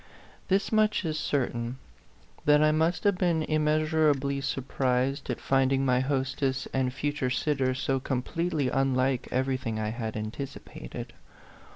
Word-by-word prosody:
This 195 Hz, +1 st, +1 dB
much 215 Hz, -3 st, +2 dB
is 155 Hz, -1 st, -1 dB
certain, 120 Hz, -3 st, -1 dB, 0.7 s
that 150 Hz, 0 st, +6 dB
I 155 Hz, 0 st, +4 dB
must 160 Hz, +2 st, +1 dB
have 200 Hz, -3 st, +2 dB
been 170 Hz, -4 st, +2 dB
immeasurably 155 Hz, -2 st, +1 dB
surprised 135 Hz, 0 st, -1 dB
at -, -, -2 dB
finding 135 Hz, 0 st, +2 dB
my 125 Hz, -1 st, +3 dB
hostess 135 Hz, 0 st, -1 dB
and 130 Hz, -1 st, +1 dB
future 145 Hz, 0 st, -2 dB
sitter 130 Hz, 0 st, 0 dB
so 135 Hz, 0 st, 0 dB
completely 140 Hz, +3 st, -1 dB
un 135 Hz, -1 st, +1 dB
like 130 Hz, 0 st, +1 dB
everything 130 Hz, -3 st, -1 dB
I 110 Hz, 0 st, -1 dB
had 110 Hz, -1 st, -4 dB
anticipated. 110 Hz, -, -7 dB
135 Hz, 135 wpm, -28 LUFS, 130-155 Hz, 0.7 s, that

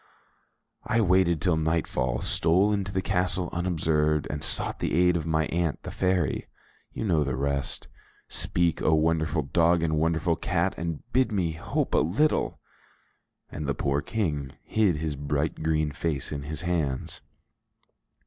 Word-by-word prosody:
I 115 Hz, -, +2 dB
waited 90 Hz, -5 st, +3 dB
till 90 Hz, -2 st, +1 dB
nightfall, 80 Hz, -6 st, 0 dB
stole 95 Hz, +6 st, +3 dB
into 100 Hz, -2 st, -2 dB
the 95 Hz, -1 st, -1 dB
castle 90 Hz, -1 st, 0 dB
unobserved, 80 Hz, -3 st, +1 dB
and 75 Hz, +1 st, -4 dB
sought -, -, +1 dB
the -, -, -1 dB
aid 90 Hz, +1 st, +4 dB
of 80 Hz, -1 st, -2 dB
my 80 Hz, -1 st, +1 dB
aunt, 85 Hz, -3 st, -1 dB
the -, -, -6 dB
fairy. 90 Hz, -5 st, 0 dB, 0.4 s
You -, -, -5 dB
know 80 Hz, -7 st, +2 dB
the 65 Hz, -3 st, -2 dB
rest. 70 Hz, -1 st, -2 dB, 0.4 s
Speak, 85 Hz, -2 st, 0 dB
O 80 Hz, -, +3 dB
wonderful 80 Hz, 0 st, +1 dB
dog 85 Hz, +4 st, +2 dB
and 80 Hz, -2 st, +1 dB
wonderful 80 Hz, +1 st, +1 dB
cat, 90 Hz, +3 st, 0 dB
and 85 Hz, -2 st, -4 dB
bid 130 Hz, -2 st, +3 dB
me 90 Hz, -6 st, 0 dB
hope 80 Hz, +1 st, -2 dB
a -, -, +5 dB
little!" 110 Hz, -, +1 dB, 0.9 s
And 75 Hz, -1 st, -5 dB
the 70 Hz, -, 0 dB
poor 70 Hz, +3 st, 0 dB
King 75 Hz, -12 st, -2 dB
hid 105 Hz, -6 st, +2 dB
his 75 Hz, -1 st, -3 dB
bright 70 Hz, +3 st, -2 dB
green 80 Hz, -1 st, +1 dB
face 75 Hz, -2 st, -3 dB
in 70 Hz, -2 st, -3 dB
his 75 Hz, +3 st, -6 dB
hands. 80 Hz, -7 st, -2 dB
80 Hz, 155 wpm, -27 LUFS, 75-90 Hz, 0.9 s, a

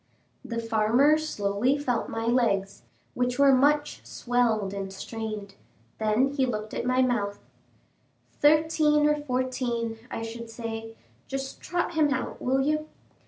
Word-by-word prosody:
The 235 Hz, -3 st, -5 dB
farmer 230 Hz, +6 st, +3 dB
slowly 245 Hz, -2 st, 0 dB
felt 250 Hz, -5 st, -1 dB
my 225 Hz, 0 st, -3 dB
legs, 225 Hz, -5 st, +1 dB, 0.3 s
which 245 Hz, 0 st, -1 dB
were 280 Hz, -1 st, +6 dB
much 290 Hz, +3 st, +2 dB
swelled 230 Hz, -5 st, 0 dB
and 195 Hz, -1 st, -4 dB
strained; 210 Hz, 0 st, -6 dB, 0.5 s
then 220 Hz, +5 st, +2 dB
he 275 Hz, -2 st, +1 dB
looked 215 Hz, -2 st, -4 dB
at -, -, -3 dB
my 255 Hz, +1 st, +3 dB
mouth. 205 Hz, -5 st, 0 dB, 1.0 s
"Thirteen 300 Hz, 0 st, +4 dB
or 300 Hz, -, +4 dB
fourteen, 250 Hz, -4 st, -2 dB
I 225 Hz, -, -4 dB
should 230 Hz, 0 st, -7 dB
say; 225 Hz, -1 st, -6 dB, 0.3 s
just 270 Hz, 0 st, -5 dB
trot 350 Hz, -1 st, -2 dB
him 305 Hz, -3 st, +3 dB
out, 260 Hz, -, -3 dB
will 265 Hz, +1 st, +1 dB
you?" 305 Hz, +2 st, 0 dB
245 Hz, 135 wpm, -27 LUFS, 225-280 Hz, 1.0 s, were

